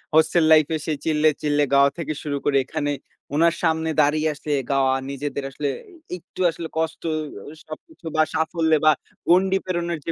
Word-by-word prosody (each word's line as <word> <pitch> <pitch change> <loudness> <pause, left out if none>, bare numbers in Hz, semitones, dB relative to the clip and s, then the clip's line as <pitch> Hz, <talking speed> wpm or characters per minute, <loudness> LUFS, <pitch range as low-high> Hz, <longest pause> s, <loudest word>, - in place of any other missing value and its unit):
hostel 160 +1 +4
লাইফে 155 0 +5
সে 155 - -1
চিল্লে, 155 -1 +3
চিল্লে 145 -1 +2
গাওয়া 140 0 +6
থেকে 160 -2 -3
শুরু 145 -2 -2
করে, 140 -1 +3
এখানে 145 +2 -2 0.4
ওনার 165 +2 +3
সামনে 160 -1 +1
দাঁড়িয়ে 155 +1 +2
আছে 150 - -10 0.2
গাওয়া 135 -1 +3 0.2
নিজেদের 140 0 -4
আসলে 145 +1 -4 0.5
এ - - 0
একটু 180 - -10
আসলে 165 0 -6
কষ্ট 160 0 -2 0.5
অ - - -10
সবকিছু 175 - -12
বা, 155 - +4
সাফল্য 160 0 0
বা, 155 - +8 0.4
গণ্ডি 190 +2 +4
প্রেরণের 170 -2 -2
যে 165 - -1
155 Hz, 170 wpm, -23 LUFS, 145-165 Hz, 0.5 s, বা